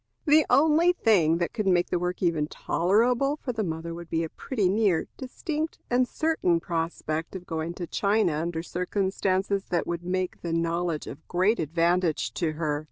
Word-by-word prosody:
The 305 0 +5
only 320 +4 +5
thing 180 - +3
that 170 0 -2
could 215 -4 -2
make 175 -2 +2
the 180 - +1
work 180 +1 -3
even 160 -4 +1
tolerable 240 - +1
to 250 - -1
the 220 -1 -1
mother 165 -1 -4
would 170 0 -9
be 165 0 0
a 160 - -4
pretty 215 - -1
near, 195 -4 +2
distinct, 305 +4 -4
and 250 +1 +3
certain 310 - +1
prospect 165 -1 -3
of 180 -1 -7
going 165 0 -4
to 175 - -4
China 200 0 +1
under 165 +2 -2
circumstances 190 +2 -1
that 175 - -1
would 170 0 -3
make 185 0 -2
the 170 -1 -3
knowledge 165 -1 -1
of 155 - -10
great 190 +6 +2
advantage 165 -4 +1
to 160 -2 -1
her. 150 -2 -1
180 Hz, 175 wpm, -26 LUFS, 165-215 Hz, -, The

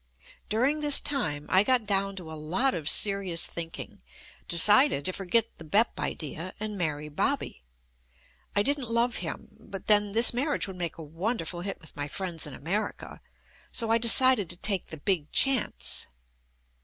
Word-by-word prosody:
During 255 +9 +1
this 295 -1 +4
time 155 - -3
I 185 - +4
got 245 0 +1
down 195 -1 0
to 175 -4 -9
a - - -7
lot 175 - 0
of 155 -3 0
seri 200 -2 +3
ous 165 0 +4
thinking, 165 - -8 0.5
decided 205 - +5
to 185 - 0
forget 205 +5 0
the - - -11
"Bep" 205 +9 +1
idea 165 +4 -5
and 215 0 -4
marry 150 -5 -2
"Bobby." 145 - -2 0.9
I 205 - +3
didn't 280 -1 -2
love 235 +1 0
him, - - -6
but 195 - -9
then 205 -1 +3
this 230 +3 +6
marriage 285 +5 0
would 190 -1 -9
make 170 -2 -4
a 165 - -8
wonderful 175 +2 -4
hit 195 +2 -5
with 155 - -16
my 145 0 -4
friends 170 -1 -4
in 140 - -9
America, 195 +9 -4 0.5
so 230 -2 +1
I 230 - +4
decided 235 -4 +5
to 175 - -5
take 195 -1 -1
the 160 - -9
"big 160 -1 -1
chance." 270 -2 0
195 Hz, 170 wpm, -27 LUFS, 165-230 Hz, 0.9 s, this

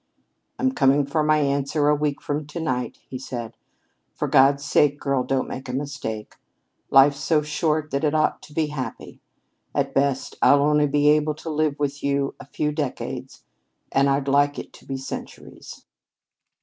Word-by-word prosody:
"I'm 260 0 +1
coming 140 - +3
for 145 +3 0
my 155 0 +3
answer 140 +1 +1
a 150 - +5
week 150 -1 -1
from 145 0 -3
to 150 +3 -6
night," 130 -6 -2
he 130 - -6
said. 120 -3 -6 0.6
"For 150 - -2
God's 140 0 +4
sake, 145 +1 +3
girl, 135 -2 0
don't 135 0 -1
make 130 0 -7
a - - -4
mistake. 135 -6 -5 0.5
Life's 140 +1 +6
so 155 -2 +1
short 155 0 -1
that 140 +2 -1
it 150 0 +1
ought 155 0 +1
to 150 - -14
be 160 - +2
happy. 130 -5 -6 0.5
At - - 0
best 140 -1 0
I'll 140 0 +5
only 150 0 +3
be 145 +1 +3
able 150 0 +2
to 160 +1 -6
live 155 -1 0
with 145 -1 -3
you 140 0 0
a - - -11
few 150 +1 -2
decades, 130 -3 -5 0.5
and 135 +1 +3
I'd 140 0 0
like 145 +1 +3
it - - -8
to - - -17
be 135 - -3
centuries." 135 - -9
145 Hz, 175 wpm, -23 LUFS, 135-150 Hz, 0.6 s, Life's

